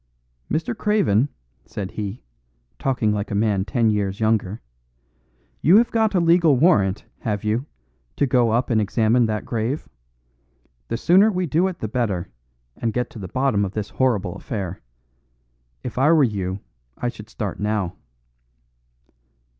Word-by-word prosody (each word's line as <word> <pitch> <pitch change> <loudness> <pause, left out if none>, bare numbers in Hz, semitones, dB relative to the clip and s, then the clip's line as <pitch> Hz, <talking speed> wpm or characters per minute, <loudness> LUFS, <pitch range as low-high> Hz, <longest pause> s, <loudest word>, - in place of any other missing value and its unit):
"Mr. 165 +9 -1
Craven," 190 - +2 0.3
said 100 -2 -6
he, 105 +2 -5 0.6
talking 125 -5 +1
like 105 0 -2
a 100 - -2
man 100 -2 +1
ten 110 +3 +1
years 100 -1 -1
younger, 110 -2 +1 1.0
"you 175 +7 +6
have 235 +1 +3
got 220 -3 +2
a - - +4
legal 170 -3 +4
warrant, 105 - +3
haven't 105 -1 -2
you, 115 +7 0 0.5
to 145 - +2
go 125 -3 +3
up 120 +3 +1
and 110 -2 +3
examine 110 +3 +2
that 110 -1 -2
grave? 115 +6 -2 1.0
The 115 - -2
sooner 190 - +5
we 185 -2 -1
do 170 +4 +2
it 185 - -4
the 110 - -4
better, 105 -6 -2 0.5
and 115 -2 -2
get 125 +1 -2
to 115 - -10
the 95 - -6
bottom 130 -1 +1
of 95 0 -3
this 105 -1 -4
horrible 120 -7 +1
affair. 95 -7 -5 1.0
If - - -4
I 145 +4 +5
were 160 -3 +5
you 100 -5 -2 0.4
I - - -2
should 110 -2 -7
start 105 -5 -4
now." 105 -4 -1
115 Hz, 155 wpm, -22 LUFS, 105-140 Hz, 1.0 s, you